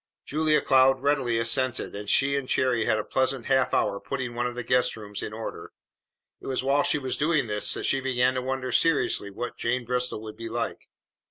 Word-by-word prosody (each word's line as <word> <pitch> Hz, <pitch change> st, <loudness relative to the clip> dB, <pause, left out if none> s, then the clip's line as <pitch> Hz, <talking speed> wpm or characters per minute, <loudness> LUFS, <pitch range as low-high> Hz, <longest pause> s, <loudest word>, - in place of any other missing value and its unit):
Julia 155 Hz, +1 st, +2 dB
Cloud 130 Hz, 0 st, +4 dB
readily 135 Hz, -5 st, +1 dB
assented, 120 Hz, +2 st, +1 dB
and 105 Hz, 0 st, -6 dB
she 140 Hz, +1 st, +3 dB
and 140 Hz, -2 st, -3 dB
Cherry 125 Hz, -4 st, +1 dB
had -, -, +2 dB
a 110 Hz, -, -2 dB
pleasant 130 Hz, 0 st, 0 dB
half 130 Hz, -1 st, +2 dB
hour 100 Hz, -, +1 dB
putting 125 Hz, +2 st, -4 dB
one 120 Hz, +1 st, -1 dB
of 120 Hz, -, -6 dB
the 125 Hz, -, -4 dB
guest 125 Hz, -1 st, +1 dB
rooms 105 Hz, -2 st, -7 dB
in -, -, -5 dB
order. 110 Hz, +1 st, -7 dB, 0.7 s
It -, -, -11 dB
was 130 Hz, -1 st, -1 dB
while 140 Hz, +2 st, +3 dB
she 150 Hz, -, +1 dB
was 130 Hz, -3 st, -3 dB
doing 150 Hz, -2 st, +2 dB
this 105 Hz, -2 st, -2 dB
that -, -, -5 dB
she 135 Hz, -, +2 dB
began 130 Hz, -1 st, +2 dB
to 130 Hz, -, -2 dB
wonder 130 Hz, 0 st, -3 dB
seriously 145 Hz, -9 st, +2 dB
what 120 Hz, +5 st, -6 dB
Jane 120 Hz, +1 st, -1 dB
Bristol 125 Hz, -2 st, -2 dB
would 110 Hz, -1 st, -9 dB
be 115 Hz, 0 st, -6 dB
like. 115 Hz, 0 st, -4 dB
125 Hz, 210 wpm, -26 LUFS, 115-135 Hz, 0.7 s, Cloud